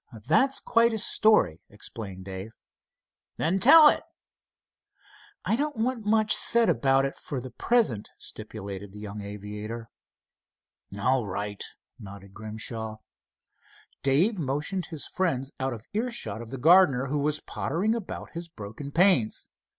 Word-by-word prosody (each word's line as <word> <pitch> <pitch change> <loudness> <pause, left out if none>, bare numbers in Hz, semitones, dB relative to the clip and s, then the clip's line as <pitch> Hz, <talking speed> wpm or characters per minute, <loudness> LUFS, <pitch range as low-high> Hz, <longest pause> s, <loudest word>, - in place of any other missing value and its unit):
"That's 265 - +3
quite 230 0 +3
a - - -1
story," 210 - +3
explained 100 -2 -7
Dave. 95 +3 -7 0.8
"Then 175 +5 +1
tell 300 +7 +9
it." - - +4 1.4
"I - - +2
don't 290 +3 -2
want 230 -1 -2
much 215 0 +3
said 235 -1 +4
about 135 +2 +3
it 135 - -3
for 140 - -5
the 125 +1 -8
present," 135 - +1
stipulated 100 -2 -7
the 105 - -10
young 105 0 -7
aviator. 105 +3 -7 1.1
"All 125 +1 +1
right," 100 +2 -4 0.4
nodded 100 -1 -11
Grimshaw. 110 +1 -5 1.0
Dave 170 +10 +2
motioned 150 +6 -2
his 160 -4 -4
friends 140 -8 -1
out 130 0 -1
of 115 -2 -8
earshot 230 - -3
of 115 - -9
the 135 - -6
gardener, 145 -3 +5
who 145 +2 -1
was 150 +1 0
pottering 185 +11 -1
about 230 -5 -6
his 170 0 -6
broken 115 +2 -8
panes. 170 - +3
135 Hz, 135 wpm, -27 LUFS, -, 1.4 s, tell